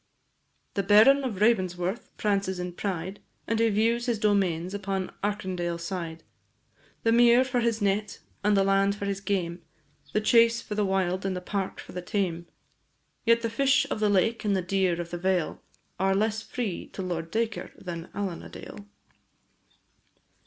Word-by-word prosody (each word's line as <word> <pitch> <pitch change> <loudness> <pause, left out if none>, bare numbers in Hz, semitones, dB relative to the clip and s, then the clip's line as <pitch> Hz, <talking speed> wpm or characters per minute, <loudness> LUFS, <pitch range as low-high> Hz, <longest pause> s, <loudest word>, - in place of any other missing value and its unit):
The 200 - 0
Baron 220 +8 +6
of 225 -8 -3
Ravensworth 185 -2 +1
prances 200 -3 0
in 180 0 -4
pride, 190 +1 -4 0.3
And 225 -1 0
he 230 0 +4
views 230 +3 +1
his 235 -2 +1
domains 190 -4 +1
upon 195 -2 -3
Arkindale 185 -4 -2
side, 170 -2 -5 0.8
The 225 - +3
mere 240 +2 +6
for 250 -1 0
his 230 -2 0
net, 200 +1 0 0.3
and 205 0 +3
the 195 - +4
land 195 +1 +3
for 205 - -5
his 200 -1 -2
game, 180 -3 -2 0.5
The - - +2
chase 230 +1 +4
for 210 - -6
the 210 0 +1
wild, 190 -1 0
and 195 -1 -1
the - - -2
park 195 +1 -3
for - - -10
the 180 - -5
tame; 175 -2 -2 0.8
Yet 230 0 +4
the 230 - 0
fish 275 +3 +3
of - - -1
the 210 -1 +2
lake 225 +4 +2
and 205 -2 +1
the 185 - -1
deer 185 -2 +1
of 170 0 -5
the 175 - -4
vale 185 -2 0 0.4
Are 195 0 +2
less 215 +2 +1
free 220 -6 -4
to 190 - -4
Lord 165 -2 -3
Dacre 225 +2 -2
than 170 -1 -7
Allen 195 -4 -3
a - - -10
Dale. 205 - -10
200 Hz, 175 wpm, -27 LUFS, 180-220 Hz, 0.8 s, Baron